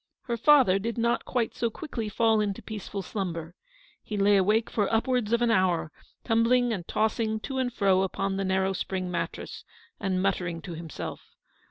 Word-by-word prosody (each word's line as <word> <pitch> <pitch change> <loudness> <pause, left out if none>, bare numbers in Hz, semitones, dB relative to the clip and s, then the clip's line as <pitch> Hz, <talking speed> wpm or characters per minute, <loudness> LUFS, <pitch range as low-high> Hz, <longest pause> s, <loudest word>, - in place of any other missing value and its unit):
Her 235 - -2
father 235 -6 +5
did 230 +4 -3
not 235 +1 +1
quite 240 -3 -1
so 235 - -1
quickly 230 -3 -5
fall 220 +1 +3
into 200 -2 -2
a - - -29
peaceful 205 -2 -6
slumber. 170 -5 -4 0.5
He 210 - -5
lay 200 +1 +4
awake 210 +4 +3
for 205 -3 0
upwards 230 -1 +1
of 235 +1 +3
an 235 - +3
hour, 175 -6 +2 0.3
tumbling 235 +1 +3
and 175 -5 -5
tossing 220 0 0
to 265 +2 -3
and 250 -1 0
fro 195 -4 +3
upon 195 +1 -1
the 195 - -1
narrow 190 0 +1
spring 185 -1 -3
mattress, 170 -1 -4 0.4
and 190 -2 0
muttering 180 -3 -1
to 175 - -6
himself. 165 -2 -7
205 Hz, 180 wpm, -27 LUFS, 190-230 Hz, 0.5 s, father